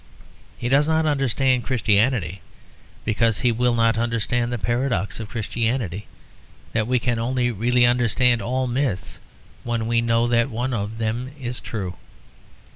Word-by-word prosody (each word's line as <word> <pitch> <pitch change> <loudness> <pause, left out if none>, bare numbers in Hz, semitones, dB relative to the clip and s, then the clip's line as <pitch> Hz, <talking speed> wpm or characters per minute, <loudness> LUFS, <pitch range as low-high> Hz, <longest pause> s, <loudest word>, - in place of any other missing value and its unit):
He 120 - -3
does 140 +4 +3
not 160 0 +2
understand 135 -3 +1
Christianity 105 - +1 0.6
because 115 0 +1
he 125 - +3
will 120 +1 +1
not 115 -1 +2
understand 120 +1 0
the 120 - -1
paradox 120 -4 -1
of 110 -2 -6
Christianity; 110 -3 -2 0.7
that 110 -1 0
we 125 +1 +2
can 120 -1 0
only 120 +1 0
really 120 +3 +3
understand 120 0 +3
all 130 +2 -1
myths 120 -7 -2 0.4
when 115 -2 -2
we 115 0 +2
know 115 0 +2
that 120 +1 +2
one 125 +2 -2
of 105 0 -3
them 115 +3 -2
is 125 -1 -4
true. 95 -6 -5
120 Hz, 145 wpm, -23 LUFS, 110-125 Hz, 0.7 s, does